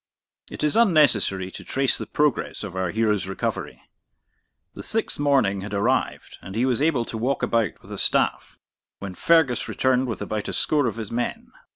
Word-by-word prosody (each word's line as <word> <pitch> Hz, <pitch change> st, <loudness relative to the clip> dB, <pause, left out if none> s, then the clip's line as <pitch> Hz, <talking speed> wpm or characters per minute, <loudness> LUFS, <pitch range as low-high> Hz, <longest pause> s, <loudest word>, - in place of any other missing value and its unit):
It -, -, -7 dB
is 150 Hz, -, +1 dB
unnecessary 140 Hz, -, +3 dB
to -, -, -9 dB
trace 135 Hz, -1 st, +1 dB
the -, -, -5 dB
progress 150 Hz, -6 st, 0 dB
of 100 Hz, -3 st, -7 dB
our 95 Hz, -1 st, -1 dB
hero's 105 Hz, -2 st, 0 dB
recovery. 95 Hz, -, -4 dB, 0.9 s
The -, -, -8 dB
sixth -, -, -2 dB
morning 130 Hz, -10 st, +2 dB
had 105 Hz, +1 st, -5 dB
arrived, 120 Hz, +6 st, -1 dB
and 95 Hz, -, -9 dB
he 120 Hz, +3 st, +1 dB
was 130 Hz, 0 st, +1 dB
able 145 Hz, -6 st, +2 dB
to 115 Hz, -, -6 dB
walk 130 Hz, +4 st, -1 dB
about 115 Hz, -5 st, 0 dB
with -, -, -14 dB
a -, -, -3 dB
staff, -, -, +1 dB, 0.4 s
when 100 Hz, -2 st, -7 dB
Fergus 160 Hz, -, +2 dB
returned 130 Hz, 0 st, +1 dB
with 115 Hz, -, -4 dB
about 105 Hz, -1 st, -4 dB
a -, -, -4 dB
score 145 Hz, -4 st, +1 dB
of 115 Hz, -, -3 dB
his 110 Hz, -3 st, -6 dB
men. 120 Hz, +1 st, -3 dB
115 Hz, 185 wpm, -24 LUFS, 100-140 Hz, 0.9 s, unnecessary